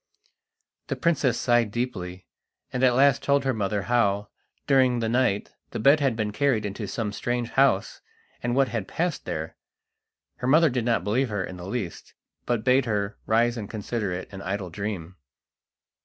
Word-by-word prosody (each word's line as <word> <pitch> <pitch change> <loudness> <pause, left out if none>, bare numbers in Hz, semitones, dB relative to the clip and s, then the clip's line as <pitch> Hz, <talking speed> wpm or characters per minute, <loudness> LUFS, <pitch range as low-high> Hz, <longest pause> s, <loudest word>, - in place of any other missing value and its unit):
The - - -2
princess 150 -7 +1
sighed 120 -2 +3
deeply, 95 -6 -4 0.5
and 125 - -1
at 125 -2 +5
last 140 +1 +4
told 140 -1 +2
her 135 - +2
mother 105 -2 -1
how, 105 -4 +1 0.4
during 130 -3 +4
the 115 -1 -1
night, 115 -4 +1 0.2
the - - -5
bed 140 +7 +5
had 135 -5 +1
been 110 -2 -1
carried 120 -2 +1
into 105 +1 -4
some 105 +1 -3
strange 120 +3 -2
house, 135 -8 +2 0.4
and 120 0 -1
what 135 -1 +3
had 110 -5 -3
passed 170 -2 -2
there. 80 +1 -4 0.8
Her 125 - -3
mother 155 +2 +5
did 120 -2 -1
not 115 -7 +1
believe 120 +6 +1
her 105 -3 -2
in 90 0 -7
the 90 +1 -8
least, 100 -6 -5 0.3
but 120 -3 0
bade 130 +1 +4
her 105 -2 -2
rise 120 +2 +2
and 105 -3 -5
consider 105 -1 -3
it 90 +1 -4
an 95 - -7
idle 95 -1 -3
dream. 95 -2 -5
115 Hz, 175 wpm, -26 LUFS, 100-130 Hz, 0.8 s, at